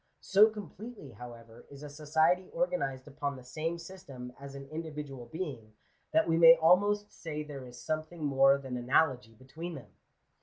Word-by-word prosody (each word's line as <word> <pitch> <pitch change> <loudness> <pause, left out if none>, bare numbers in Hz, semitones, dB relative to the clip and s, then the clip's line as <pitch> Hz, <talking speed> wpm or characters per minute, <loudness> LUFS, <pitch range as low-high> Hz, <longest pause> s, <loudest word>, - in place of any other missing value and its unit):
So 205 +3 +6
completely, 210 - -9
however, 115 0 -12
is 140 +1 -11
a - - -6
society 160 +5 +1
organized 150 - -1
upon 145 0 -3
the 130 - -11
same 160 +6 -3
system 155 -9 -10
as 140 0 -9
an 140 0 -9
in 160 +1 -3
dividual 145 -6 -7
being, 125 -8 -6 0.4
that 215 - +3
we 165 0 +2
may 165 0 +10
almost 205 +6 +3
say 150 -2 -5
there 140 -4 -8
is 125 0 -12
something 155 +1 -3
more 135 0 +5
than 130 -2 -5
analogy 125 -2 +1
between 160 +8 -8
them. 115 -10 -11
150 Hz, 165 wpm, -31 LUFS, 130-170 Hz, 0.4 s, may